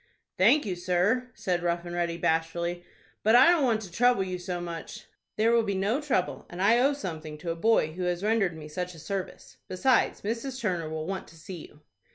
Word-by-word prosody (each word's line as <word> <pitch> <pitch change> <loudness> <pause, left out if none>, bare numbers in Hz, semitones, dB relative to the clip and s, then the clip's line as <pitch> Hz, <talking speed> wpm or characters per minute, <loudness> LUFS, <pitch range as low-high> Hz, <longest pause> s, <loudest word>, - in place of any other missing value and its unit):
"Thank 240 +10 +4
you, 190 -3 -2
sir," 185 +8 +1
said 180 -2 -1
Rough 170 0 -1
and 175 - -6
Ready, 170 -1 -1
bashfully, 170 +2 -1 0.4
"but 220 +2 +4
I 255 +6 +8
don't 335 -4 +3
want 230 -4 +2
to 185 - -10
trouble 245 +1 +3
you 185 -1 -4
so 180 0 -4
much." 175 +5 -7 0.3
"There 225 +2 +3
will 235 0 +4
be 200 -3 -2
no 205 +9 0
trouble, 255 -11 -1
and 175 - -9
I 220 +5 +4
owe 275 +3 +3
something 160 - -6
to 165 +2 -4
a - - -3
boy 170 -4 +2
who 180 +2 -3
has 175 +1 -1
rendered 205 -6 +1
me 155 -1 -9
such 180 +3 -5
a - - -12
service. 195 +3 -6
Besides, 235 +7 +2
Mrs. 235 +5 -3
Turner 180 -9 -2
will 155 0 -4
want 190 +2 -4
to - - -16
see 165 +1 -9
you." 150 - -22
185 Hz, 215 wpm, -28 LUFS, 170-225 Hz, 0.4 s, I